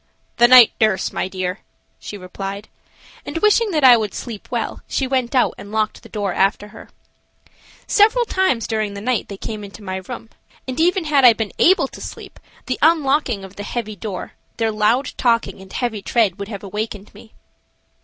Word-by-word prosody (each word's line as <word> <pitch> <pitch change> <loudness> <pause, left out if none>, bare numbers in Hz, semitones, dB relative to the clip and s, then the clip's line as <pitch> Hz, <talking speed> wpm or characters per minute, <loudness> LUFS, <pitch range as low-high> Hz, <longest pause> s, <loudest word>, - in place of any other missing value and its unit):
"The 240 - +6
night 250 -2 +8
nurse, 215 -4 +1
my - - -2
dear," 185 0 -4 0.4
she 205 - -8
replied, 195 +2 -7 0.5
and, - - -5
wishing 425 +5 +3
that 310 -6 0
I 250 -2 +9
would 215 -3 -3
sleep 225 -5 -7
well, 235 -3 -3
she 270 - -1
went 260 -1 -1
out 250 - +3
and 200 - -10
locked 215 0 -1
the - - -15
door 205 -4 -2
after 200 +1 0
her. 220 - -13 1.0
Several 445 +3 +4
times 375 - 0
during 215 -2 -2
the - - -5
night 245 +1 -1
they 200 - -8
came 215 +1 -6
into 205 +1 -11
my 190 -1 -4
room, 225 +3 -8 0.4
and 255 +2 -4
even 355 +2 +2
had 290 -3 +3
I 245 -2 +9
been 220 -2 -4
able 375 +3 +4
to - - -12
sleep, - - -9 0.3
the 255 - -3
unlocking 285 -9 +2
of 190 0 -12
the 205 - -5
heavy 215 -1 -4
door, 195 -1 -6 0.3
their 225 -1 0
loud 220 +5 +1
talking, 230 -5 0
and 190 -1 -14
heavy 235 -5 -3
tread, 205 -4 +1
would 200 - -5
have 205 -2 -7
awakened 210 0 -5
me. 220 +2 -16
220 Hz, 190 wpm, -20 LUFS, 200-255 Hz, 1.0 s, I